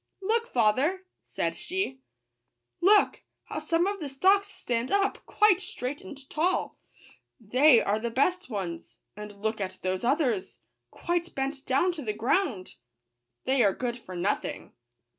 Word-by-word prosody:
" - - -52
Look, 455 +4 +1
father 260 - +2
!" - - -54
said - - 0
she; 365 -8 -3 0.4
" - - -54
look, 420 - +4 0.2
how - - -5
some 335 +1 +1
of 400 0 -2
the 295 -4 -5
stalks 385 +9 +3
stand 245 - -3
up, 400 0 +1
quite 420 -4 +4
straight 265 -6 -5
and 270 +7 -11
tall! 345 +6 -1 0.3
— - - -37 0.2
they 285 -5 +8
are 205 +2 +1
the 235 +1 -2
best 355 +9 0
ones; 180 -6 -5 0.2
and 210 -1 -10
look 220 -1 -1
at 190 -1 -4
those 185 +2 -1
others, 250 - 0 0.3
quite 345 0 -3
bent 270 +1 -3
down 275 +8 +3
to 335 -3 -7
the 215 -6 -2
ground! 230 - -1 0.3
— 120 0 -56
they 265 0 +2
are 195 -2 +3
good 245 -2 -2
for 185 -5 -10
nothing." 185 +4 -2
265 Hz, 165 wpm, -28 LUFS, 210-355 Hz, 0.4 s, they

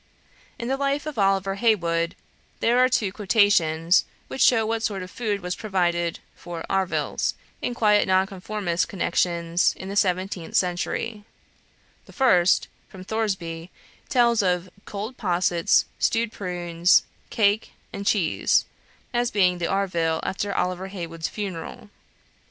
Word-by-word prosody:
In 235 - -5
the 270 +1 0
life 280 +1 -1
of 305 -7 -5
Oliver 195 0 +2
Heywood 170 -6 +1 0.4
there 240 +2 +3
are 255 0 +5
two 215 -6 +1
quotations, 185 -5 +3 0.3
which 265 - -4
show 225 -3 +5
what 225 +1 -1
sort 200 -4 -2
of 185 - -10
food 210 -4 -2
was 180 0 -3
provided 175 -5 0 0.2
for 170 -1 -7
"arvills" 190 -1 -1 0.3
in 245 - -2
quiet 210 -3 +3
Nonconformist 190 -1 0
connections 170 -2 0
in 190 - -7
the 200 - -5
seventeenth 185 -3 -1
century; 195 +4 -1 0.8
the - - -15
first 185 -10 +3 0.2
(from 185 -1 -11
Thoresby) 185 -6 -3 0.4
tells 235 -2 +3
of 180 -1 0
"cold 215 +5 -6
possets, 175 -4 +2
stewed 230 -1 +1
prunes, 175 -2 +2 0.3
cake, 210 0 +1 0.2
and 200 - -5
cheese," 195 -5 +2 0.5
as 240 0 +1
being 180 -4 +2
the 170 - -1
arvill 170 -5 0
after 200 +1 -2
Oliver 185 0 -2
Heywood's 165 -4 -5
funeral. 200 0 -6
190 Hz, 130 wpm, -24 LUFS, 175-215 Hz, 0.8 s, are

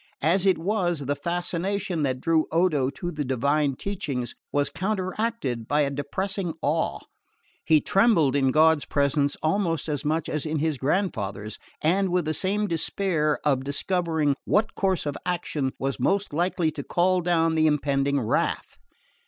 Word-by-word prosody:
As 185 +5 +3
it 190 - +4
was, 175 -3 0
the 140 +1 -1
fascination 175 +3 -2
that 130 -3 0
drew 160 +2 +2
Odo 160 -6 +2
to 175 +5 -5
the 150 -2 -3
divine 140 +2 +1
teachings 140 -10 -4 0.2
was 145 -1 0
counteracted 185 - -2
by 150 +1 +2
a 140 -1 +1
depressing 185 +5 -3
awe: 160 +3 0 0.6
he 155 -1 +5
trembled 195 - +3
in 135 -2 +3
God's 155 +2 +4
presence 140 0 +1
almost 165 -1 0
as 145 -3 -2
much 155 +2 0
as 150 - -2
in 155 0 -2
his 150 -2 -1
grandfather's, 110 - -2 0.2
and 190 +5 +2
with 180 -2 +1
the 155 - 0
same 200 +5 0
despair 165 -3 0
of 135 -3 +2
discovering 160 0 0
what 215 +1 +1
course 190 -5 0
of 145 -1 -2
action 155 -6 -2
was 135 0 -2
most 200 -4 0
likely 170 0 +1
to 145 -2 -6
call 180 +4 +2
down 165 -2 +2
the 160 0 +3
impending 140 -1 +1
wrath. 110 - -1
160 Hz, 155 wpm, -25 LUFS, 140-185 Hz, 0.6 s, he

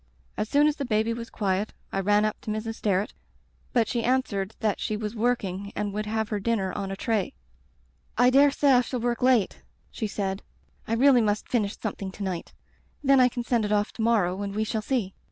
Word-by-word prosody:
"As 215 - -2
soon 290 +1 +4
as 300 0 +2
the 280 - -2
baby 220 -2 +1
was 230 0 -6
quiet 200 0 -1 0.2
I 195 - -1
ran 205 +2 +3
up 215 - -2
to - - -7
Mrs. 215 +1 -2
Sterret, 200 0 0 0.6
but 235 -3 +2
she 235 -2 -1
answered 220 -6 0
that 215 -3 0
she 215 - -2
was 210 0 -4
working 200 -4 -1
and 205 -1 -2
would 210 +1 -3
have 220 0 -1
her 210 - -1
dinner 195 -3 -1
on 195 -1 -3
a 195 - -3
tray. 215 -2 -1 0.8
"*I 245 +2 +5
dare 280 +2 +6
say 280 0 +2
I 250 -1 +6
shall 250 +1 -4
work 235 0 -1
late,' 250 -6 +2 0.3
she 220 - -3
said. 195 -1 -3 0.5
*I 225 - -1
really 255 +1 +5
must 210 -1 0
finish 210 -4 0
something 200 -3 -4
to 205 - -6
night. 185 -3 -4 0.5
Then 275 -1 +5
I 250 0 +6
can 240 0 -4
send 235 -2 +1
it 210 - -2
off 210 0 +1
to - - -6
morrow 200 -5 +2
and 200 0 -4
we 215 - +1
shall 220 0 -2
see.' 215 -5 -1
215 Hz, 220 wpm, -26 LUFS, 200-240 Hz, 0.8 s, dare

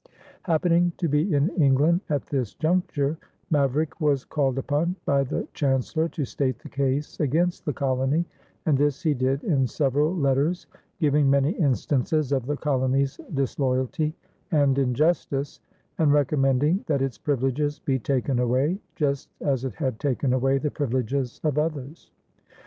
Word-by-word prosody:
Happening 170 +1 +2
to 170 - 0
be 150 +6 +1
in 145 +2 +2
England 150 +6 +4
at 145 -3 -1
this 130 -7 -3
juncture, 160 -3 0 0.3
Maverick 150 +3 +1
was 145 -3 +1
called 135 -4 0
upon 150 +6 0
by 140 -1 +2
the 130 - -3
Chancellor 140 +4 0
to 150 - -3
state 130 +1 -2
the - - -12
case 140 +1 -2
against 165 +5 0
the 150 - -1
colony, 135 +5 0 0.4
and 155 - +3
this 145 +4 0
he 155 -3 +3
did 135 +1 0
in 140 - +2
several 145 +6 +1
letters, 145 +3 +1 0.3
giving 145 -2 +3
many 140 +2 +3
instances 145 - 0
of 130 -3 0
the 145 0 -1
colony's 135 -1 0 0.2
disloyalty 135 +3 -1 0.4
and 140 -4 +3
injustice, 140 +1 0 0.4
and 155 -3 +4
recommending 145 - +2
that 140 -3 +1
its 135 -3 -3
privileges 145 +1 0
be 135 -1 -1
taken 130 +1 0
away, 130 +9 +1 0.2
just 140 -3 -1
as 135 -3 0
it 130 - -4
had 130 -7 -2
taken 135 -2 0
away 135 +1 +2
the 150 +1 -2
privileges 130 -1 -2
of 150 -2 +1
others. 150 -1 -4
140 Hz, 150 wpm, -25 LUFS, 135-155 Hz, 0.4 s, England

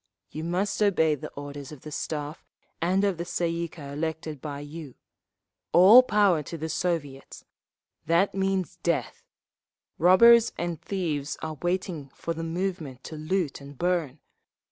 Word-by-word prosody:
You 155 - -5
must 185 +6 -1
obey 170 -7 +3
the 145 - -6
orders 145 0 -8
of 150 -4 -11
the 155 - -9
Staff 150 +1 -4 0.4
and 185 +4 +2
of 195 -4 0
the - - -1
Tsay 170 -1 -1
ee 170 0 -2
kah 145 -4 -10
elected 160 -1 -4
by 145 -2 -5
you. 145 -2 -9 0.8
All 200 +8 +9
Power 205 -9 +3
to 165 +3 -7
the 160 +1 -4
Soviets—that 165 +2 -3
means 190 -3 -1
death! - - -1 0.8
Robbers 230 +7 +7
and 170 -2 -3
thieves 155 -7 -3
are 155 -2 -5
waiting 175 -5 -2
for 165 - -3
the 165 0 -5
moment 165 -6 -4
to 160 - -8
loot 155 -1 -2
and 140 0 -12
burn…. 170 -5 0
165 Hz, 145 wpm, -27 LUFS, 150-185 Hz, 0.8 s, All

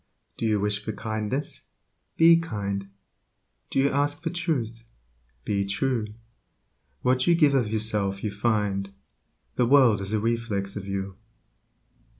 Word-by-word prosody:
Do 115 - -2
you 105 -1 +2
wish 105 0 0
for 110 - -4
kindness? 110 +6 -4 0.5
Be 165 +1 +7
kind. 100 -10 -4 0.8
Do - - -3
you 135 +1 +3
ask 145 +2 0
for 165 - -1
truth? 140 -11 -2 0.6
Be 100 -1 0
true. 110 +3 -1 1.0
What 130 0 +2
you 170 - +6
give 150 -4 +4
of 125 -6 +2
yourself 105 -3 0
you 105 - -1
find; 100 -2 0 0.7
Your 120 - +4
world 125 -6 +5
is 100 +1 -3
a 110 - +1
reflex 110 -3 -2
of 100 -1 -6
you. 95 -1 -4
110 Hz, 140 wpm, -26 LUFS, 100-135 Hz, 1.0 s, Be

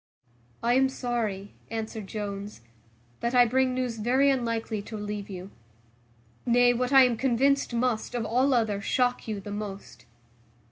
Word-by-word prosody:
"I 240 +1 +3
am 265 +1 +4
sorry," 225 -6 -3 0.2
answered 220 -2 -5
Jones, 205 - -6 0.6
"that 235 +2 -1
I 245 -1 +7
bring 255 +2 +1
news 250 -3 -2
very 260 +6 +3
unlikely 230 -4 -2
to 220 +2 -9
relieve 205 -1 -5
you: 190 0 -8 0.9
nay, 245 0 +4
what 250 +2 -1
I 270 -1 +8
am 245 -2 +2
convinced 270 +3 +2
must, 240 -1 -1
of 235 -2 -1
all 255 +4 +2
other, 215 -4 0
shock 245 +4 0
you 215 -2 -3
the 205 +1 -8
most. 200 - -7
230 Hz, 150 wpm, -27 LUFS, 210-250 Hz, 0.9 s, I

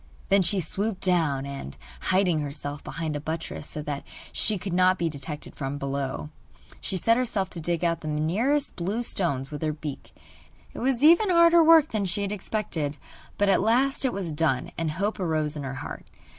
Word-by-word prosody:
Then 195 -1 +5
she 190 +2 +3
swooped 195 +4 -1
down, 160 -7 +2
and, 140 - -7 0.3
hiding 185 -4 +3
herself 145 0 -5
behind 160 -2 -4
a - - -2
buttress 160 0 -5
so 150 - -5
that 145 -2 -4 0.3
she 215 -1 +1
could 185 0 -4
not 185 +1 +4
be 170 -1 0
detected 150 0 -5
from 135 0 -4
below, 140 +1 -3 0.5
she 190 - -1
set 230 +6 +3
herself 220 -7 -1
to 170 - -6
dig 170 +1 -1
out 170 -1 +1
the 155 - -6
nearest 200 - 0
blue 200 +7 -2
stones 140 - -1
with 150 - -6
her 155 -1 0
beak. 150 -2 -8 0.6
It - - -7
was 260 +1 +1
even 340 +6 +6
harder 340 -1 +6
work 320 -2 +7
than 210 -3 -1
she 195 +3 -1
had 200 - -2
expected; 180 -8 -2 0.4
but 205 - +2
at 195 - +4
last 250 +7 +3
it 260 - +2
was 190 -6 -3
done, 150 -4 0
and 165 -1 -1
hope 200 +7 -2
arose 155 -4 0
in 150 - -4
her 135 -1 -5
heart. - - -7
175 Hz, 195 wpm, -26 LUFS, 150-210 Hz, 0.6 s, work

